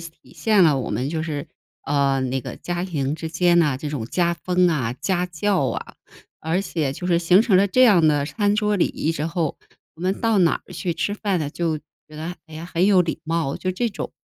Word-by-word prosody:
体 165 -1 -13
现 210 -5 +3
了 145 -4 +4
我 - - -4
们 125 +7 -2
就 160 -1 -2
是， 150 -1 -4 0.4
呃， 140 -2 +1
那 130 +1 -1
个 - - -7
家 175 0 -4
庭 150 -6 -2
之 160 0 -5
间 175 +1 +3
哪 150 -6 +3
这 145 +1 -5
种 120 -7 -4
家 170 +4 +1
风 180 +1 +1
啊、 130 -8 -1
家 180 +5 -1
教 180 -3 0
啊。 - - -5 0.5
而 165 +5 0
且 155 -8 -2
就 180 +5 -6
是 170 -2 +3
形 180 +4 +5
成 205 -6 +3
了 200 +2 +4
这 255 +7 +3
样 185 -10 +6
的 145 -2 +2
餐 205 +5 0
桌 210 -1 +1
礼 - - +3
仪 160 - -2
之 155 0 -2
后， 165 -3 -2 0.4
我 - - -15
们 185 +2 -1
到 225 -2 +2
哪 175 -3 +2
儿 - - -13
去 175 -3 -3
吃 190 +5 -1
饭 205 -3 -1
呢， 150 -3 -3
就 165 0 -1
觉 150 - -27 0.2
得 160 +3 -6
哎 160 - -12
呀 160 +2 -7
很 175 +3 +3
有 190 -3 +5
礼 165 - -3
貌， 165 -3 -1
就 185 - -2
这 235 +6 -1
种 - - -6
170 Hz, 255 characters per minute, -22 LUFS, 150-185 Hz, 0.5 s, 样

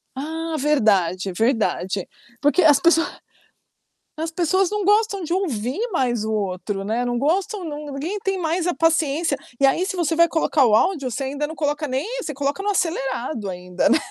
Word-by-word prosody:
Ah, 320 +3 -4
verdade, 200 - +2
verdade. 210 -4 0 0.3
Porque 295 +5 +3
as 290 -3 +6
pessoa 335 +2 +4 1.1
as 320 +1 -3
pessoas 360 +3 +1
não 415 -2 -2
gostam 415 -2 +2
de 335 - -2
ouvir 275 - -2
mais 245 - 0
o 220 - -2
outro, 195 -1 -2
né, 230 +4 -1
não 245 0 -1
gostam 375 - 0
não 300 -1 -5
não 280 - -7
ninguém 340 +10 -3
tem 390 -1 0
mais 335 +1 -1
a 355 - 0
paciência, 325 -2 +1 0.2
e 275 - +5
aí 345 +8 +2
se 380 - -3
você 330 -2 0
vai 335 +1 +5
colocar 315 -4 +2
o 215 - +4
áudio 280 - +1
você 270 +4 -3
ainda 285 +2 -2
não 320 - -8
coloca 295 0 -1
nem 265 +8 -2
você 300 - -4
coloca 285 +6 -2
no 410 - -1
acelerado 265 - -1
ainda, 180 0 -1
né - - +5
295 Hz, 185 wpm, -22 LUFS, 245-340 Hz, 1.1 s, as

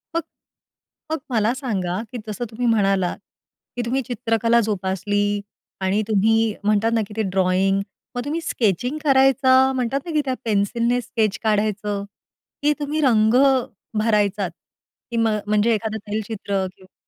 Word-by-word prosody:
मग 335 - +2 0.9
मग 320 - +1
मला 220 +1 +2
सांगा 200 -8 -2
की 245 - -5
जसं 215 +3 -4
तुम्ही 240 +2 -3
म्हणालात, 195 -5 +2 0.6
की 245 - -1
तुम्ही 260 +3 0
चित्रकला 235 -1 +1
जोपासली 205 0 -1 0.4
आणि 190 +3 +1
तुम्ही 220 +1 +3
म्हणतात 215 +2 +2
ना, 225 - +2
की 210 - -11
ते - - +2
ड्रॉइंग, 190 +1 +2 0.3
मग 245 - -2
तुम्ही 315 +4 -2
स्केचिंग 245 - 0
करायचा 265 -1 +5
म्हणतात 255 +2 0
ना, 340 - -5
की 305 - +3
त्या 260 - 0
पेन्सिलने 230 +4 +1
स्केच 220 -5 -1
काढायचं, 210 -1 0 0.6
की 295 +1 +4
तुम्ही 295 +2 -1
रंग 220 -5 +4 0.7
भरायचात, 210 -3 +1 0.6
की 235 - -2
मग 220 -2 +2
म्हणजे 215 +2 +3
एखादं 220 0 -2
तैलचित्र 205 -2 -2
किंवा 190 0 -21
220 Hz, 140 wpm, -22 LUFS, 205-245 Hz, 0.9 s, करायचा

